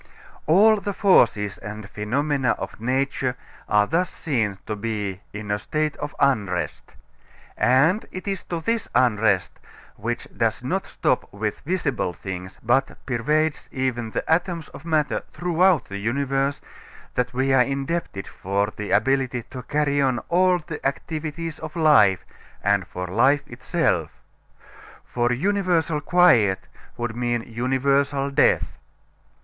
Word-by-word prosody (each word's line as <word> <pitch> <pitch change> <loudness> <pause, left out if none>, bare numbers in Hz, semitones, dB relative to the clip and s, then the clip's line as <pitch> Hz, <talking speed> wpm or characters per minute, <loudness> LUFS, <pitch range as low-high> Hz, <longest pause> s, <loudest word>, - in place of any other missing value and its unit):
All 210 +7 +6
the 205 0 -3
forces 105 - +3
and 105 -1 -7
phenomena 130 +5 0
of - - -7
nature 130 +1 0 0.3
are 105 -1 +4
thus 170 - 0
seen 115 - -1
to 105 - -3
be 105 -3 -3
in 105 0 -6
a 105 - 0
state 155 +5 -1
of 145 -1 -6
unrest. 100 - 0 0.6
And 150 - +3
it 185 +2 -7
is 195 -1 -2
to 170 -2 -4
this 230 +5 -1
unrest, 105 -7 +2 0.4
which - - -3
does - - 0
not - - -2
stop - - -1
with 105 +1 -3
visible 150 - -1
things, 95 0 -7
but 120 +4 +1
pervades 150 +5 0
even 125 -3 -2
the - - -4
atoms 170 0 0
of - - -12
matter 155 -3 +1
throughout 175 -1 +2
the 100 0 -6
universe, 135 +5 -1 0.5
that 125 0 -1
we 130 +2 +1
are 130 - +6
indebted 135 - -2
for 100 +2 -2
the 105 -1 -5
ability 125 +2 +1
to 130 -2 -6
carry 145 +2 0
on 130 -3 +2
all 180 +1 +4
the 155 -2 -7
activities 155 +3 -3
of 155 -1 -7
life, 110 - +5 0.4
and 100 -2 +2
for 90 0 -5
life 130 +10 +3
itself. 120 -2 -1 1.0
For 120 0 0
universal 170 0 +1
quiet 125 - +4 0.3
would 120 -1 -3
mean 120 -1 -1
universal 135 +4 0
death. 140 - +2
135 Hz, 135 wpm, -23 LUFS, 110-155 Hz, 1.0 s, All